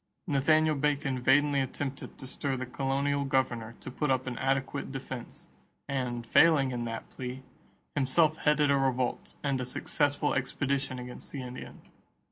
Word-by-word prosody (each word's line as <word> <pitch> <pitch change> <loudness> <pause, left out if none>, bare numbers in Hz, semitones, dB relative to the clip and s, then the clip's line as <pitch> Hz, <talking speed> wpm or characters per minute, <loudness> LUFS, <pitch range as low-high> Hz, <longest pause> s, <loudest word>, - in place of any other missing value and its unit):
Nathaniel 155 +1 +3
Bacon 140 -2 0
vainly 145 +2 +4
attempted 135 +1 -4
to 135 - -9
stir 135 +1 -2
the 130 - -3
colonial 140 +2 0
governor 120 -4 0
to - - -7
put 150 +3 -1
up 130 -1 +2
an 130 -2 -3
adequate 135 +1 -1
defense 130 -2 -7 0.4
and, 125 -3 -2
failing 140 +1 +5
in 120 -1 -2
that 115 -1 -5
plea, 130 +1 -6 0.5
himself 150 +3 +3
headed 150 -1 +3
a 140 - +4
revolt 130 -2 0
and 140 -3 0
a - - -1
successful 145 +3 0
expedition 135 0 -1
against 125 0 -8
the 135 -3 -5
Indians. 125 0 -9
135 Hz, 150 wpm, -30 LUFS, 130-145 Hz, 0.5 s, failing